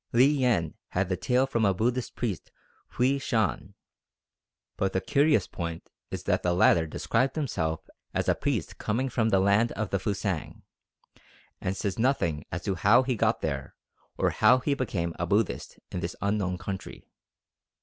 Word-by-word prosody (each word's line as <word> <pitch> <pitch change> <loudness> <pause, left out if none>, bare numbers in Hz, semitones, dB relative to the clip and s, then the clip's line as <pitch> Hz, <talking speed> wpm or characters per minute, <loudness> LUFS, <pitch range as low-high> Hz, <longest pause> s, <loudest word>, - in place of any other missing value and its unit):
Li 120 +2 +6
Yen 125 - +2 0.2
had 90 0 0
the 95 - +1
tale 125 +8 +2
from 115 -4 -1
a 100 -2 +3
Buddhist 120 +5 -1
priest 110 -8 -3 0.4
Hwui 135 +3 +2
Shan; 110 - -1 1.0
but 95 -1 -1
the 95 - +2
curious 140 - +3
point 85 -1 -6 0.2
is - - -5
that - - +1
the 90 -1 +1
latter 85 -2 +4
described 130 +11 0
himself 80 - -2 0.2
as - - -1
a - - +5
priest - - -2
coming 125 +5 -1
from 115 -2 +1
the 95 - +3
"Land 100 +4 +3
of 110 -3 -3
the 100 - +1
Fusang," 95 -4 -3 1.0
and 95 +1 -2
says 100 +1 -2
nothing 95 - +1
as 85 +2 -4
to 100 - 0
how 105 +8 +4
he 130 -1 -1
got 110 +1 +1
there, 70 -4 -3 0.4
or - - +2
how 125 - +5
he 140 +3 0
became 95 -11 -2
a 90 - -1
Buddhist 100 +2 0
in - - -3
this 85 -1 -4
unknown 100 -2 0
country. 95 +2 -7
100 Hz, 170 wpm, -28 LUFS, 90-125 Hz, 1.0 s, Li